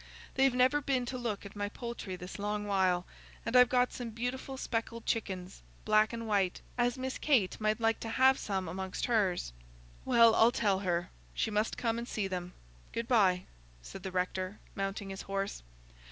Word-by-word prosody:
They've 270 Hz, -1 st, +3 dB
never 255 Hz, +4 st, +4 dB
been 260 Hz, -3 st, 0 dB
to 255 Hz, +1 st, -4 dB
look 220 Hz, -4 st, -3 dB
at 200 Hz, -, -10 dB
my 205 Hz, 0 st, -2 dB
poultry 235 Hz, -4 st, -6 dB
this 180 Hz, +3 st, -8 dB
long 210 Hz, +1 st, -2 dB
while, 185 Hz, -3 st, +2 dB, 0.4 s
and 230 Hz, -, -2 dB
I've 250 Hz, -1 st, +8 dB
got 250 Hz, 0 st, +2 dB
some 245 Hz, -2 st, -5 dB
beautiful 245 Hz, +4 st, -4 dB
speckled 230 Hz, -2 st, -3 dB
chickens, 185 Hz, -, -3 dB, 0.2 s
black 215 Hz, 0 st, +4 dB
and 230 Hz, -1 st, -5 dB
white, 195 Hz, -4 st, +1 dB, 0.2 s
as 245 Hz, +1 st, +1 dB
Miss 260 Hz, 0 st, -4 dB
Kate 235 Hz, -10 st, +2 dB
might 215 Hz, +1 st, +1 dB
like 225 Hz, 0 st, +2 dB
to 225 Hz, -, -5 dB
have 265 Hz, +3 st, +4 dB
some 190 Hz, -3 st, -2 dB
of -, -, -4 dB
amongst 190 Hz, +1 st, -3 dB
hers." 195 Hz, -, +1 dB, 0.5 s
"Well, 230 Hz, -1 st, +6 dB
I'll 225 Hz, +2 st, +6 dB
tell 205 Hz, -6 st, +1 dB
her; 175 Hz, -3 st, -1 dB, 0.2 s
she -, -, 0 dB
must 210 Hz, +1 st, 0 dB
come 230 Hz, -1 st, 0 dB
and 235 Hz, -, -5 dB
see 210 Hz, -5 st, -2 dB
them. 180 Hz, -1 st, -4 dB, 0.4 s
Good 230 Hz, 0 st, -3 dB
bye," 190 Hz, -7 st, +3 dB, 0.4 s
said -, -, -9 dB
the 190 Hz, -, -5 dB
rector, 185 Hz, +2 st, -2 dB, 0.2 s
mounting 195 Hz, 0 st, -3 dB
his 195 Hz, -, -6 dB
horse. 195 Hz, 0 st, -3 dB
215 Hz, 185 wpm, -32 LUFS, 190-240 Hz, 0.5 s, I've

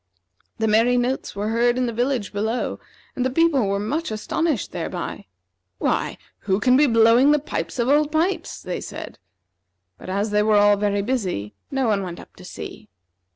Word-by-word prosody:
The 220 Hz, -, 0 dB
merry 230 Hz, +3 st, +4 dB
notes 245 Hz, -1 st, -1 dB
were 205 Hz, +2 st, -2 dB
heard 240 Hz, +2 st, +2 dB
in 255 Hz, -, +1 dB
the 235 Hz, -, -2 dB
village 245 Hz, -3 st, -1 dB
below, 220 Hz, +4 st, -2 dB, 0.4 s
and 250 Hz, -, -1 dB
the 260 Hz, -, +1 dB
people 280 Hz, -5 st, +2 dB
were 200 Hz, 0 st, 0 dB
much 290 Hz, +11 st, -2 dB
astonished 240 Hz, -, -1 dB
thereby. -, -, -5 dB, 0.5 s
"Why, -, -, -1 dB, 0.2 s
who 190 Hz, -1 st, 0 dB
can 250 Hz, +4 st, +4 dB
be 290 Hz, +2 st, +5 dB
blowing 230 Hz, +3 st, +5 dB
the 300 Hz, -, +5 dB
pipes 290 Hz, -1 st, -4 dB
of 235 Hz, -1 st, 0 dB
Old 295 Hz, +2 st, +3 dB
Pipes?" 330 Hz, +2 st, -1 dB
they 180 Hz, -, -4 dB
said. -, -, -8 dB, 0.8 s
But, -, -, -9 dB
as 200 Hz, +3 st, -1 dB
they 210 Hz, 0 st, +3 dB
were 210 Hz, 0 st, +3 dB
all 205 Hz, 0 st, +5 dB
very 205 Hz, 0 st, 0 dB
busy, 185 Hz, -, -2 dB, 0.2 s
no 270 Hz, -3 st, 0 dB
one 205 Hz, -2 st, +1 dB
went 175 Hz, -2 st, -6 dB
up -, -, -14 dB
to -, -, -13 dB
see. -, -, -9 dB
230 Hz, 185 wpm, -22 LUFS, 205-265 Hz, 0.8 s, be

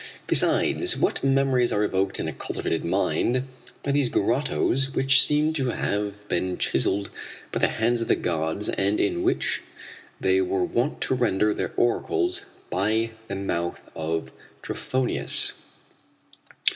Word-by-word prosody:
Besides, -, -, +4 dB
what -, -, 0 dB
memories 135 Hz, -2 st, +2 dB
are 105 Hz, -, +1 dB
evoked 95 Hz, -1 st, 0 dB
in -, -, -2 dB
a 80 Hz, -, -4 dB
cultivated 80 Hz, +4 st, -3 dB
mind 100 Hz, +7 st, 0 dB, 0.4 s
by 140 Hz, -, -1 dB
these 140 Hz, -3 st, +2 dB
grottoes 135 Hz, +3 st, 0 dB
which 135 Hz, 0 st, +6 dB
seem 150 Hz, +1 st, +2 dB
to 135 Hz, -5 st, -1 dB
have 105 Hz, -2 st, -3 dB
been 90 Hz, -2 st, -1 dB
chiselled 100 Hz, +1 st, +1 dB, 0.4 s
by -, -, -2 dB
the -, -, +3 dB
hands 115 Hz, +1 st, 0 dB
of 115 Hz, -, -2 dB
the -, -, +3 dB
gods 80 Hz, +4 st, -2 dB
and 100 Hz, +2 st, 0 dB
in 350 Hz, 0 st, 0 dB
which 360 Hz, +1 st, 0 dB, 0.6 s
they 375 Hz, -1 st, +2 dB
were 370 Hz, +1 st, 0 dB
wont 345 Hz, -, -1 dB
to -, -, +2 dB
render 105 Hz, -4 st, +1 dB
their -, -, -3 dB
oracles 365 Hz, -, +1 dB, 0.3 s
by 110 Hz, +5 st, +1 dB, 0.2 s
the 100 Hz, -, -4 dB
mouth 85 Hz, -3 st, -3 dB, 0.2 s
of 80 Hz, 0 st, -3 dB, 0.3 s
Trophonius." 130 Hz, -1 st, 0 dB
115 Hz, 140 wpm, -25 LUFS, 100-135 Hz, 0.6 s, which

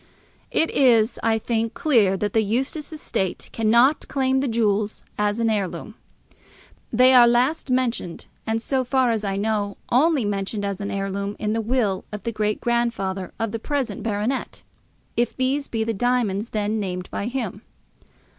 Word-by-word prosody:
It 325 Hz, -, +1 dB
is, 235 Hz, -4 st, +3 dB
I 225 Hz, 0 st, +2 dB
think, 225 Hz, +1 st, -1 dB
clear 220 Hz, -11 st, +3 dB
that 205 Hz, +1 st, -2 dB
the 220 Hz, -, +4 dB
Eustace 265 Hz, +9 st, -2 dB
estate 195 Hz, -, -3 dB
cannot 235 Hz, +6 st, +3 dB
claim 265 Hz, -1 st, +1 dB
the 275 Hz, -, 0 dB
jewels 215 Hz, -3 st, 0 dB
as 210 Hz, +1 st, 0 dB
an 230 Hz, -, +2 dB
heirloom. 205 Hz, -4 st, -2 dB, 1.0 s
They 255 Hz, +3 st, +6 dB
are 245 Hz, -2 st, +8 dB
last 255 Hz, +6 st, +2 dB
mentioned, 250 Hz, -9 st, -1 dB, 0.2 s
and, 220 Hz, -, +1 dB
as 260 Hz, -2 st, 0 dB
far 260 Hz, -2 st, +3 dB
as 220 Hz, -2 st, -1 dB
I 195 Hz, -1 st, -1 dB
know, 205 Hz, -1 st, -1 dB
only 280 Hz, 0 st, +3 dB
mentioned 205 Hz, +1 st, -2 dB
as 200 Hz, 0 st, -3 dB
an 200 Hz, -, -3 dB
heirloom 200 Hz, +1 st, -3 dB
in 210 Hz, 0 st, -1 dB
the 225 Hz, -, 0 dB
will 220 Hz, -5 st, 0 dB
of 210 Hz, -2 st, -6 dB
the 230 Hz, -, -2 dB
great 215 Hz, -1 st, -1 dB
grandfather 225 Hz, -6 st, -1 dB
of 225 Hz, -2 st, -1 dB
the 230 Hz, -, -3 dB
present 255 Hz, -5 st, -2 dB
baronet, 225 Hz, +4 st, -2 dB, 0.5 s
if 240 Hz, +1 st, 0 dB
these 270 Hz, +2 st, 0 dB
be 225 Hz, -1 st, -1 dB
the 225 Hz, +1 st, -1 dB
diamonds 230 Hz, -2 st, 0 dB
then 215 Hz, 0 st, -1 dB
named 180 Hz, -2 st, -4 dB
by 200 Hz, -, -3 dB
him. 235 Hz, -6 st, -3 dB
225 Hz, 165 wpm, -23 LUFS, 205-250 Hz, 1.0 s, are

